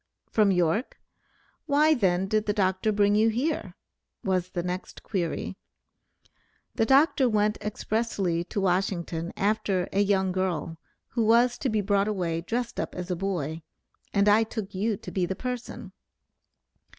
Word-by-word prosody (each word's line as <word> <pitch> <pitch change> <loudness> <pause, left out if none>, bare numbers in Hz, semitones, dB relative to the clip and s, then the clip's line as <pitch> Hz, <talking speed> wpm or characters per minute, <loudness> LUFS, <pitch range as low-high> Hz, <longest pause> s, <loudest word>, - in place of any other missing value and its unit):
"From 215 -2 +4
York? 180 - +1 0.7
Why 300 +2 +4
then 190 -7 +1
did 215 +1 0
the 205 - +2
Dr. 190 +1 +1
bring 205 0 +3
you 215 +2 +4
here?" 235 - -2 0.5
was 185 -2 0
the 175 -2 -3
next 180 +1 -5
query, 175 -6 -3 1.2
"the 225 - +1
Dr. 270 -1 +4
went 210 -1 +1
expressly 210 -5 -1
to 200 - -3
Washington 180 -3 -1
after 200 -3 0
a 195 - +1
young 195 -2 +2
girl, 175 -3 -2 0.3
who 230 - 0
was 235 +2 +4
to 270 - -1
be 215 -2 +1
brought 200 0 +1
away 175 -6 -1
dressed 235 +6 -3
up - - -3
as 180 0 -5
a - - +1
boy, 165 -4 -3 0.5
and 200 0 +2
I 210 +2 +6
took 220 -3 -4
you 205 +2 0
to - - -9
be 180 -2 0
the 190 - -3
person." 250 +2 -6
200 Hz, 150 wpm, -27 LUFS, 180-220 Hz, 1.2 s, I